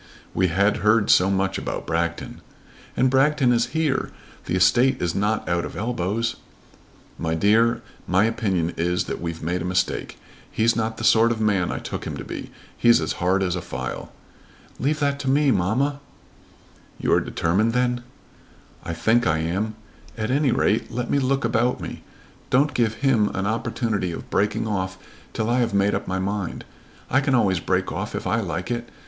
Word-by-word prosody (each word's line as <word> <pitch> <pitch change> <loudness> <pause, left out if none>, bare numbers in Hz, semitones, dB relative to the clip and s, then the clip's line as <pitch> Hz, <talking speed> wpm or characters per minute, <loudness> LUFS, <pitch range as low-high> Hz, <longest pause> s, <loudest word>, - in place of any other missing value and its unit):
"We 95 - +2
had 100 +4 +2
heard 105 0 +3
so 95 +2 +5
much 95 0 0
about - - -4
Bragton!" 85 0 -2 0.6
"And 130 - +4
Bragton 135 -1 +3
is 120 0 +2
here. 150 -4 0 0.4
The 90 - -1
estate 120 +9 +4
is 85 -1 -1
not 105 +2 0
out 85 -1 0
of - - -7
elbows." 110 0 -1 0.8
"My 80 0 -1
dear, 115 +6 +3 0.2
my 95 +3 +3
opinion 95 -7 0
is 90 +2 0
that - - -5
we've 85 -2 -5
made 90 +2 -1
a 90 +1 -2
mistake. 90 0 -1 0.3
He's 115 +1 +2
not 110 0 -2
the - - -6
sort 115 +1 +5
of 115 - -2
man 100 -5 +1
I - - -3
took - - -5
him - - -5
to - - -6
be. - - -7 0.3
He's 120 -4 +5
as 80 - -2
hard 95 +2 +2
as 90 -1 0
a 90 - -3
file." 65 -4 -6 0.7
"Leave 150 +4 0
that 140 -1 +1
to 135 - -2
me, 140 +1 +3
mamma." 130 +9 +1 1.0
"You - - +1
are - - +4
determined 105 +7 0
then?" 125 -1 +1 0.8
"I 85 -2 -4
think 115 +7 +2
I 80 - +2
am. 95 +7 -2 0.4
At 110 +1 -2
any 140 0 +2
rate 110 - +1
let 120 0 -3
me 140 - +3
look 135 0 0
about 115 +2 +1
me. - - -7 0.5
Don't 140 +3 +3
give 115 -3 +1
him 115 -6 +3
an 95 - -1
opportunity 110 -3 -1
of 85 - -8
breaking 105 +2 +1
off 95 -3 -2 0.4
till 110 - -1
I 120 +2 +2
have 115 -4 0
made 100 +1 +3
up - - -2
my 95 - -1
mind. 100 0 -3 0.4
I 130 - +2
can 135 -2 +1
always 95 -7 +2
break - - -1
off - - -4
if - - -4
I 110 - +1
like 90 +1 -3
it. 120 0 -3
110 Hz, 185 wpm, -23 LUFS, 90-120 Hz, 1.0 s, so